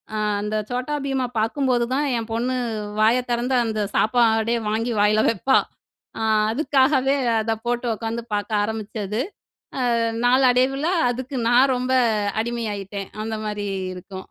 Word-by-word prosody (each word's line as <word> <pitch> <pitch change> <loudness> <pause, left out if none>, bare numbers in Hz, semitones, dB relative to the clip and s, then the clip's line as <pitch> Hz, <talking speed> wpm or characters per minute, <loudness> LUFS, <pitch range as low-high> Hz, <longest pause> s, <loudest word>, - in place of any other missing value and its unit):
அ - - -1 0.2
அந்த 210 +1 -3
Chhota 255 +4 -2
Bheemஅ 265 -2 -1
பார்க்கும்போது 245 +1 +1
தான் 290 +2 +1
என் 225 0 -5
பொண்ணு 250 +3 -1 0.4
வாய 225 +3 +4
திறந்து, 240 +2 0
அந்த 215 -1 -2
சாப்பாடே 225 0 +3
வாங்கி 225 +3 -1
வாயில 215 +1 +4
வைப்பா. 230 +5 +2 0.6
அ - - -3 0.3
அதுக்காகவே 270 0 +2 0.3
அத 225 +1 0
போட்டு 240 0 -1
உட்காந்து 230 +1 -4
பார்க்க 205 0 0
ஆரம்பிச்சது. 215 0 -3 0.8
அ - - +1 0.3
நாளடைவுல 260 +3 +3 0.2
அதுக்கு 260 +2 -4
நான் 255 +3 +5
ரொம்ப 255 +1 -1 0.5
அடிமையாயிட்டேன்! 205 -4 -4
அந்த 220 0 -3
மாரி 210 -1 -3 0.3
இருக்கும். 185 +1 -9
235 Hz, 130 wpm, -22 LUFS, 215-255 Hz, 0.8 s, நான்